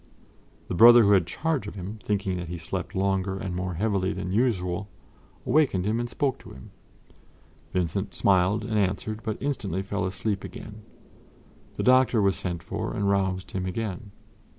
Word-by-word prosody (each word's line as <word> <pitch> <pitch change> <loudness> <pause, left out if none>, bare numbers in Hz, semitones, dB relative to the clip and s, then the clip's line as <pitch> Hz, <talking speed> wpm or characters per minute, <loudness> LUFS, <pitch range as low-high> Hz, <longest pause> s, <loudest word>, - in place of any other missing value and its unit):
The - - -4
brother 120 +5 +9
who 100 - +4
had 95 -4 +4
charge 150 - -1
of - - -7
him, 100 +3 -7
thinking 95 -3 -1
that 90 -1 -5
he 85 +1 -5
slept 90 +3 -5
longer 95 0 0
and 95 -2 -4
more 90 -1 -3
heavily 95 0 0
than 90 - -4
usual, 100 -4 0 0.6
awakened 130 -9 +2
him 110 +3 0
and 120 0 -3
spoke 135 +2 -1
to - - -13
him. 65 - -12 1.0
Vincent 90 +2 -2
smiled 100 +3 +2
and 110 -2 0
answered, 100 +3 -1
but 110 -2 -3
instantly 100 - -2
fell 100 -1 -2
asleep 95 +2 -2
again. 105 +3 -9 0.9
The - - -2
doctor 130 -2 +5
was 100 -3 +3
sent 85 -3 -4
for, - - -4
and 100 -1 +1
roused 95 -1 -1
him 95 -1 -3
again. 105 +2 -4
100 Hz, 170 wpm, -26 LUFS, 95-110 Hz, 1.0 s, brother